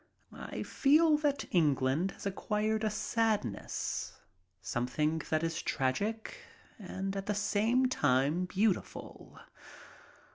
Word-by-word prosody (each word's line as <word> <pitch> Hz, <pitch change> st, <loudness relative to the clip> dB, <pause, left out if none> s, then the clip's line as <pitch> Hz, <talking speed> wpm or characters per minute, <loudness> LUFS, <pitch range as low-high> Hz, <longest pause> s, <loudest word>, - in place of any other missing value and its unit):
I -, -, -6 dB
feel 305 Hz, +3 st, +4 dB
that 290 Hz, -2 st, 0 dB
England 150 Hz, 0 st, +2 dB
has -, -, -11 dB
acquired 215 Hz, +2 st, -1 dB
a 215 Hz, -, +2 dB
sadness, 215 Hz, -, -1 dB, 0.5 s
something 125 Hz, +11 st, -1 dB
that 155 Hz, 0 st, +1 dB
is 165 Hz, -1 st, -1 dB
tragic 210 Hz, -, -2 dB, 0.4 s
and 195 Hz, 0 st, -4 dB
at 195 Hz, 0 st, -4 dB
the 210 Hz, -, 0 dB
same 220 Hz, +5 st, +2 dB
time 145 Hz, -, +2 dB
beautiful. 195 Hz, +1 st, -2 dB
195 Hz, 105 wpm, -32 LUFS, 150-220 Hz, 0.5 s, feel